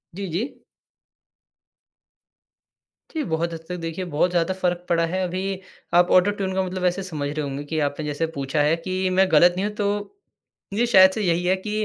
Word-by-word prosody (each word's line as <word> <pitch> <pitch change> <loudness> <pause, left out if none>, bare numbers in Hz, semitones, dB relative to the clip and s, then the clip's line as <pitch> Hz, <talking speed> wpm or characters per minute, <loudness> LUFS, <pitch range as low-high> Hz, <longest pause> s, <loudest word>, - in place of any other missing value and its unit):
जी, 195 0 -4
जी। 185 - -4 2.5
जी, 315 -2 -2
बहुत 165 +1 -2
हद 165 - -5
तक 180 - -3
देखिए 165 +2 -4
बहुत 150 +5 +2
ज़्यादा 175 +1 +1
फ़र्क 180 -1 -2
पड़ा 170 -1 +3
है, 185 +3 -2
अभी 185 +1 -3 0.3
आप 175 +1 +5
ऑटो-ट्यून 190 0 +3
का 190 - +1
मतलब 185 0 -4
वैसे 180 +2 0
समझ 150 -6 -4
रहे 150 +1 -3
होंगे 140 0 -4
कि 155 +2 -3
आपने 145 +2 -5
जैसे 150 +2 -1
पूछा 140 +2 -1
है 150 +2 +3
कि 185 +2 -2
मैं 190 +1 +3
गलत 175 +3 +6
नहीं 195 - 0
हूँ 210 - -3
तो 205 - -2 0.6
जी, 235 +4 +2
शायद 190 -5 +7
से 215 +3 -3
यही 175 -2 +1
है 185 +1 +3
कि 215 +2 -2
180 Hz, 195 wpm, -23 LUFS, 165-190 Hz, 2.5 s, शायद